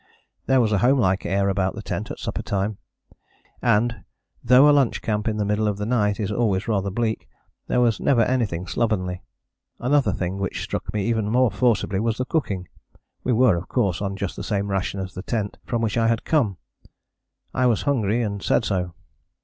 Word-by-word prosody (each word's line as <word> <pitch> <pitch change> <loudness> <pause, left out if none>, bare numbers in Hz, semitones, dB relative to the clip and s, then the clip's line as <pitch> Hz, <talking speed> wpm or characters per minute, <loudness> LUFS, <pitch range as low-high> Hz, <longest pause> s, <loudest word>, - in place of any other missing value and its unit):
There 135 -1 +4
was 115 -3 +2
a 100 - +2
homelike 120 -6 +2
air 100 +2 +1
about 95 -1 0
the - - -7
tent - - -4
at - - -6
supper - - -4
time, 100 +1 -2 0.8
and, 115 0 +1 0.4
though 125 +4 +7
a - - +7
lunch 140 -4 +2
camp 105 0 -1
in 110 -1 0
the 105 - 0
middle 105 +1 +1
of 105 -2 -1
the 105 - -3
night 105 -4 +1
is 105 -1 -2
always 105 -3 0
rather 100 -3 0
bleak, 110 +2 -2 0.4
there - - +1
was 115 -3 +2
never 120 -4 +3
anything 110 -9 -1
slovenly. 90 -5 -1 0.6
Another 140 +3 +2
thing 95 +1 -3
which 95 -2 -3
struck - - -4
me 105 -2 -1
even 110 -3 0
more 125 0 +3
forcibly 105 -3 +1
was 115 +1 0
the 130 - -1
cooking. 100 - -2 0.6
We 125 - +1
were 120 -4 +4
of 85 - -6
course 95 -2 0
on 100 -1 -2
just 100 -2 -4
the - - -6
same 100 -1 -1
ration 100 0 -2
as 95 -1 -5
the 95 - -6
tent 105 0 -3
from 115 -1 -1
which 115 +1 0
I 115 - +3
had 115 0 +1
come. 120 - +1 1.0
I 130 -1 +2
was 115 -3 +1
hungry 120 -5 +1
and 100 -2 -3
said - - +1
so. 90 -3 -2
105 Hz, 200 wpm, -23 LUFS, 100-120 Hz, 1.0 s, though